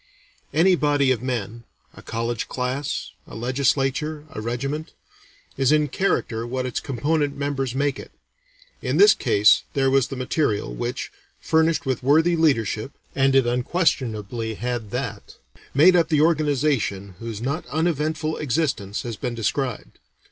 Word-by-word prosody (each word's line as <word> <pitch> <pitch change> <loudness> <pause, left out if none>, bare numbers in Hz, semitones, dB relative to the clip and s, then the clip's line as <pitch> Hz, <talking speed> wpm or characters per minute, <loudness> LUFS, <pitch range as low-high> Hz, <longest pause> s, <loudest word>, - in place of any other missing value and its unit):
Any 170 +6 +4
body 145 -4 +2
of 125 - 0
men 115 -3 -4 0.3
a - - -13
college 115 0 -3
class, 130 +3 -3 0.2
a - - -11
legislature, 135 +5 0
a 110 - -6
regiment 140 +7 -3 0.6
is 135 0 +3
in 150 -1 +3
character 120 -10 -1
what 130 +1 -2
its 125 - -2
component 145 +2 -1
members 135 -3 -2
make 140 0 0
it; - - -10 0.7
in - - -1
this 415 +1 +8
case 105 0 +4
there 135 -1 +2
was 135 -2 +3
the 135 - -6
material, 125 - -1
which, - - -4 0.3
furnished 160 0 +2
with 130 -3 -1
worthy 160 +6 +4
leadership 135 -6 +1 0.2
and 135 -1 +3
it 135 -2 +5
unquestionably 120 - -1
had 120 -1 -3
that 125 -3 -5 0.4
made 175 +6 +7
up 170 -2 +3
the 155 -3 +3
organization 145 - +1
whose 115 -3 -6
not 140 +8 -2
uneventful 155 +1 -1
existence 130 -8 -1
has 120 -2 -4
been 120 +2 -4
described. 115 +3 -3
135 Hz, 140 wpm, -23 LUFS, 120-150 Hz, 0.7 s, this